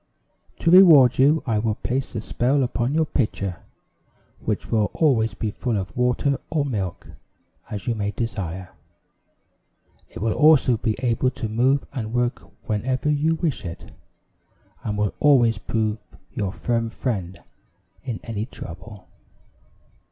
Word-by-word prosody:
"To 165 Hz, -, +1 dB
reward 160 Hz, -10 st, +8 dB
you, 150 Hz, +4 st, +4 dB
I 110 Hz, -5 st, +1 dB
will 110 Hz, -1 st, 0 dB
place 130 Hz, +2 st, -3 dB
a 110 Hz, -, -2 dB
spell 130 Hz, +5 st, +1 dB
upon 125 Hz, +2 st, -1 dB
your 160 Hz, 0 st, +3 dB
pitcher, 100 Hz, -, -2 dB, 0.8 s
which -, -, -3 dB
will 110 Hz, -2 st, +2 dB
always 120 Hz, -8 st, +2 dB
be 110 Hz, -, -3 dB
full 120 Hz, 0 st, -2 dB
of 95 Hz, -2 st, -5 dB
water 125 Hz, +3 st, +1 dB
or 150 Hz, -3 st, 0 dB
milk, 100 Hz, -10 st, -3 dB, 0.6 s
as 105 Hz, -3 st, -5 dB
you 120 Hz, -, 0 dB
may 100 Hz, -2 st, -2 dB
desire. 95 Hz, -5 st, -4 dB, 1.4 s
It -, -, -10 dB
will 110 Hz, +3 st, 0 dB
also 150 Hz, -6 st, +5 dB
be 110 Hz, 0 st, -1 dB
able 125 Hz, +1 st, +2 dB
to 125 Hz, -3 st, -5 dB
move 130 Hz, +6 st, +1 dB
and 115 Hz, -5 st, -4 dB
work 120 Hz, 0 st, 0 dB, 0.3 s
whenever 130 Hz, +7 st, 0 dB
you 155 Hz, +2 st, +1 dB
wish 160 Hz, -3 st, -2 dB
it, 85 Hz, -3 st, -8 dB, 0.9 s
and 105 Hz, -1 st, -3 dB
will 105 Hz, -1 st, 0 dB
always 120 Hz, -7 st, +4 dB
prove 110 Hz, -1 st, -1 dB, 0.3 s
your 100 Hz, -3 st, -2 dB
firm 115 Hz, +2 st, -1 dB
friend 95 Hz, -8 st, -4 dB, 0.6 s
in 120 Hz, -5 st, -4 dB
any 110 Hz, 0 st, -4 dB
trouble. 100 Hz, -1 st, -10 dB
115 Hz, 140 wpm, -23 LUFS, 105-135 Hz, 1.4 s, reward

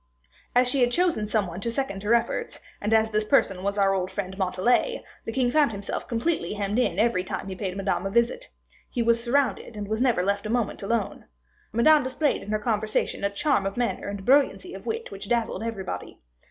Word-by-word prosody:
As 250 Hz, 0 st, +5 dB
she 265 Hz, +1 st, +2 dB
had 245 Hz, -, +5 dB
chosen 340 Hz, -10 st, +1 dB
some 215 Hz, -1 st, +1 dB
one 175 Hz, +2 st, -7 dB
to 235 Hz, -, -1 dB
second 230 Hz, -5 st, -2 dB
her 210 Hz, +3 st, +3 dB
efforts, 350 Hz, -, -2 dB, 0.2 s
and 210 Hz, -, -1 dB
as 220 Hz, 0 st, +3 dB
this 215 Hz, 0 st, +1 dB
person 210 Hz, -5 st, +2 dB
was 200 Hz, +1 st, -2 dB
our 195 Hz, -1 st, +3 dB
old 185 Hz, -1 st, -1 dB
friend 190 Hz, -1 st, -4 dB
Montalais, 200 Hz, -, +1 dB, 0.2 s
the -, -, -3 dB
king 245 Hz, 0 st, +1 dB
found 295 Hz, -3 st, +4 dB
himself 200 Hz, -1 st, -4 dB
completely 230 Hz, -, -1 dB
hemmed 205 Hz, +2 st, -1 dB
in 250 Hz, -, +1 dB
every 220 Hz, -5 st, +2 dB
time 190 Hz, -, -5 dB
he 190 Hz, -, -5 dB
paid 190 Hz, -1 st, -4 dB
Madame 195 Hz, -1 st, -1 dB
a -, -, -2 dB
visit; 235 Hz, +3 st, +1 dB, 0.4 s
he 240 Hz, -, -1 dB
was 235 Hz, 0 st, +2 dB
surrounded, 250 Hz, -3 st, 0 dB
and 205 Hz, -1 st, -4 dB
was 220 Hz, +2 st, -1 dB
never 245 Hz, -8 st, +3 dB
left 200 Hz, +2 st, 0 dB
a -, -, -6 dB
moment 235 Hz, -2 st, -1 dB
alone. 210 Hz, +1 st, -2 dB, 0.5 s
Madame 295 Hz, +8 st, +5 dB
displayed 260 Hz, +3 st, 0 dB
in -, -, -9 dB
her 215 Hz, -, +1 dB
conversation 215 Hz, -2 st, -1 dB
a 200 Hz, -, +2 dB
charm 200 Hz, -1 st, +1 dB
of 195 Hz, -, -5 dB
manner 240 Hz, -1 st, -1 dB
and 200 Hz, -1 st, -5 dB
brilliancy 290 Hz, +7 st, +3 dB
of -, -, -9 dB
wit 455 Hz, +1 st, -3 dB
which 200 Hz, +1 st, -8 dB
dazzled 235 Hz, -2 st, 0 dB
everybody. 195 Hz, -, -5 dB
220 Hz, 215 wpm, -26 LUFS, 200-245 Hz, 0.5 s, As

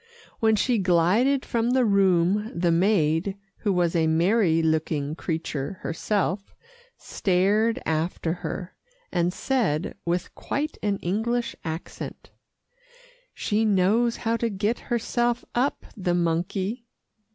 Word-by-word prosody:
When 220 Hz, -1 st, +4 dB
she 235 Hz, +2 st, +1 dB
glided 195 Hz, +10 st, +3 dB
from 235 Hz, 0 st, 0 dB
the 255 Hz, 0 st, +3 dB
room, 195 Hz, 0 st, +3 dB
the 170 Hz, -1 st, +3 dB
maid, 175 Hz, 0 st, +2 dB, 0.2 s
who 205 Hz, -, 0 dB
was 175 Hz, -2 st, +1 dB
a 160 Hz, -1 st, +3 dB
merry 165 Hz, +1 st, +3 dB
looking 155 Hz, -2 st, 0 dB
creature 160 Hz, -3 st, -3 dB
herself, 195 Hz, +3 st, -2 dB, 0.4 s
stared 205 Hz, +5 st, +1 dB
after 160 Hz, +1 st, -1 dB
her, 180 Hz, -1 st, -5 dB, 0.4 s
and 175 Hz, -1 st, +1 dB
said 195 Hz, -, 0 dB
with 175 Hz, +1 st, -2 dB
quite 300 Hz, +2 st, -3 dB
an 205 Hz, -1 st, 0 dB
English 230 Hz, +6 st, -1 dB
accent, 160 Hz, +1 st, -7 dB, 1.0 s
"She 215 Hz, +1 st, 0 dB
knows 215 Hz, +3 st, +2 dB
how 230 Hz, +1 st, +2 dB
to 230 Hz, 0 st, 0 dB
get 210 Hz, +3 st, -1 dB
herself 240 Hz, 0 st, 0 dB
up 255 Hz, +4 st, 0 dB
the 180 Hz, -4 st, 0 dB
monkey." 185 Hz, +7 st, -1 dB
195 Hz, 120 wpm, -25 LUFS, 170-225 Hz, 1.0 s, When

